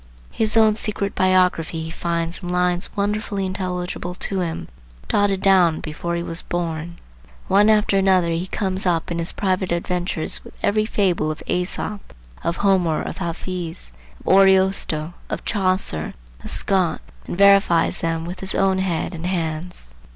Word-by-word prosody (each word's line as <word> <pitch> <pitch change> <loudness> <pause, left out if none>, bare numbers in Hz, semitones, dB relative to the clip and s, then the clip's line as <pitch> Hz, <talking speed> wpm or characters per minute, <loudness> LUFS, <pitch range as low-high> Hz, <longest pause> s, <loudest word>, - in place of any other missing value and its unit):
His 220 0 +1
own 220 -1 +6
secret 205 -2 -2
biography 180 -3 +2
he 160 - -6
finds 170 +1 -3
in 175 - -5
lines 180 0 0
wonderfully 205 -1 -1
intelligible 180 -1 -3
to 195 +1 -2
him, 165 -3 -3 0.4
dotted 200 -2 +1
down 180 -5 +4
before 170 +3 -4
he 170 - -2
was 165 +1 -3
born. 170 -1 -4 0.5
One 205 +2 +5
after 210 -2 +3
another 185 -3 +3
he 170 +3 -2
comes 190 -1 -1
up 170 -1 0
in 170 - -1
his 170 +1 -1
private 185 -2 -1
adventures 175 -1 -1
with - - -14
every 215 +1 +2
fable 180 -8 +1
of 155 - -5
Æsop, 185 +3 -2 0.4
of 170 - 0
Homer, 185 -6 +2
of - - -6
Hafiz, 170 - -5 0.3
of - - +3
Ariosto, 190 -4 +3 0.2
of - - -4
Chaucer, 185 - -1 0.3
of - - -5
Scott, 185 -4 +1 0.3
and - - -4
verifies 195 -4 +5
them 165 0 -1
with 175 +2 -6
his 190 0 -3
own 190 -1 +2
head 185 -1 -1
and 170 +1 -4
hands. 160 - -4
180 Hz, 155 wpm, -22 LUFS, 170-195 Hz, 0.5 s, own